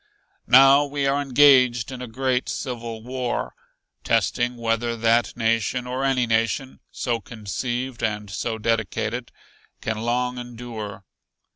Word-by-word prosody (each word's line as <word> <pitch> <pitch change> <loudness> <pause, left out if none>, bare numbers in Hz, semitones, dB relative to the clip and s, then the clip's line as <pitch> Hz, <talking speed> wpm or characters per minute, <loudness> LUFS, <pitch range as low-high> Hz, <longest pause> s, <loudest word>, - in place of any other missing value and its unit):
"Now 135 +3 +7
we 145 -1 -2
are 140 +1 +2
engaged 130 -4 +4
in 130 -1 -7
a 125 - -5
great 125 +2 -1
civil 115 -3 -5
war, 125 0 -3 0.5
testing 120 0 +1
whether 115 0 -1
that 115 +2 +2
nation 115 +1 0
or 130 +2 -3
any 130 -2 +2
nation, 115 +4 -1
so 120 -2 -2
conceived 120 +4 -4
and 105 -1 -2
so 110 +3 -3
dedicated, 110 -2 -2 0.5
can 110 -1 -3
long 125 +2 -1
endure. 115 -5 -7
120 Hz, 125 wpm, -23 LUFS, 115-130 Hz, 0.5 s, Now